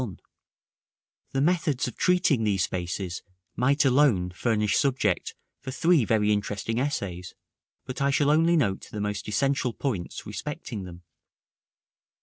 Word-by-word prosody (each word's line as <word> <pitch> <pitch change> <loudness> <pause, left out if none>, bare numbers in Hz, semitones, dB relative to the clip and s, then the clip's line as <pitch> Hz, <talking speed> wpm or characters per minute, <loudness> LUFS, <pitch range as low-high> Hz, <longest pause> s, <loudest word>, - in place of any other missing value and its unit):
§ 120 -6 -3
IX. - - -18 1.1
The 135 - +1
methods 155 -5 +1
of 125 - -6
treating 175 -9 +2
these 100 -4 +1
spaces 90 0 -3 0.3
might 140 +4 +2
alone 125 -10 +3
furnish 105 +1 0
subject 125 -9 +1 0.2
for 130 - -8
three 160 0 +3
very 105 -1 +2
interesting 105 +2 -1
essays; 95 -10 -3 0.5
but 130 +1 -6
I 140 - +3
shall 145 +1 +3
only 165 +3 +4
note 100 -10 0
the 105 - -5
most 105 -1 -3
essential 130 +3 0
points 110 -12 -4
respecting 95 - -6
them. 90 -1 -11
115 Hz, 135 wpm, -26 LUFS, 100-140 Hz, 1.1 s, only